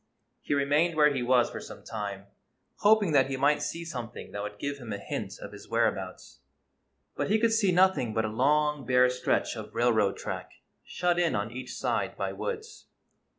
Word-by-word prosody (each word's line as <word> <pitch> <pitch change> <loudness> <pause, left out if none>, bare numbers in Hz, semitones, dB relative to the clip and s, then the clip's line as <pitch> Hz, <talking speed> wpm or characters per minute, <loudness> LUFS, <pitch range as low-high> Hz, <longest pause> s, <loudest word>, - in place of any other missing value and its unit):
He 145 - -1
remained 145 +4 +2
where 150 -1 +5
he 135 - -1
was 120 0 +3
for - - -6
some - - -11
time, 100 -3 -5 0.5
hoping 205 -4 +4
that 140 -3 +4
he 135 - -2
might 145 +2 +3
see 170 0 -4
something 120 -8 -7
that 100 - -4
would 105 0 -6
give 140 +4 -4
him 120 -4 -8
a 100 - -2
hint 100 - -5
of - - -8
his - - -12
whereabouts. - - -2 0.8
But - - -2
he 215 - +4
could 225 0 +2
see 210 -4 +3
nothing 180 -10 +3
but 110 0 0
a - - -2
long, 150 +5 +2
bare 125 +1 +4
stretch 125 -1 0
of 110 -2 -9
railroad 110 -4 +2
track, - - -6 0.3
shut 175 0 0
in 175 -2 +2
on 105 +2 -2
each 130 +1 -7
side - - -1
by - - -2
woods. 445 -2 -6
140 Hz, 195 wpm, -28 LUFS, 115-170 Hz, 0.8 s, where